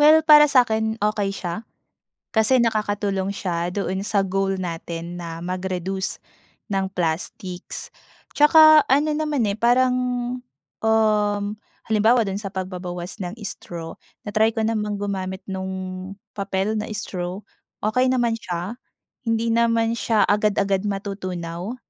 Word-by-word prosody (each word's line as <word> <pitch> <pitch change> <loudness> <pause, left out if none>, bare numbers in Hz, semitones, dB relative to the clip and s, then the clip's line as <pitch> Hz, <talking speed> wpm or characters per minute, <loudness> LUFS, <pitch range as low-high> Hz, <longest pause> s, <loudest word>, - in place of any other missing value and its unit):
Well 310 +1 +7
para 300 -1 +8
sa'kin, 220 -4 +2
okey 210 -1 0
siya. 195 +1 -5 0.7
Kasi 220 +4 +4
nakakatulong 205 -4 0
siya 175 -3 -2
doon 190 0 -2
sa 200 -1 +1
goal 195 0 0
natin 170 -1 -5
na 165 -1 -6
mag-reduce 185 +2 -3 0.5
ng 195 -1 0
plastics. 180 +1 -4 0.4
'Tsaka 310 +1 +8
ano 290 +3 +4
naman 300 -6 0
eh, 200 - 0
parang, 245 +3 +3 0.9
um, 215 -2 +2 0.4
halimbawa 220 +2 +3
do'n 195 +1 -3
sa 200 -2 -5
pagbabawas 180 0 -5
ng 180 +4 -5
straw 165 -3 -7 0.3
na-try 215 +2 +3
ko 220 - +1
namang 210 -2 -1
gumamit 190 -2 -4
nung 190 -1 -4 0.6
papel 195 +1 -1
na 210 - -5
straw 180 -3 -4 0.5
okey 250 +5 +2
naman 240 -3 +2
siya. 180 -1 -4 0.5
Hindi 230 0 +1
naman 230 0 +2
siya 225 -2 +2
agad-agad 200 -2 +2
matutunaw, 190 0 -4
205 Hz, 120 wpm, -23 LUFS, 185-225 Hz, 0.9 s, para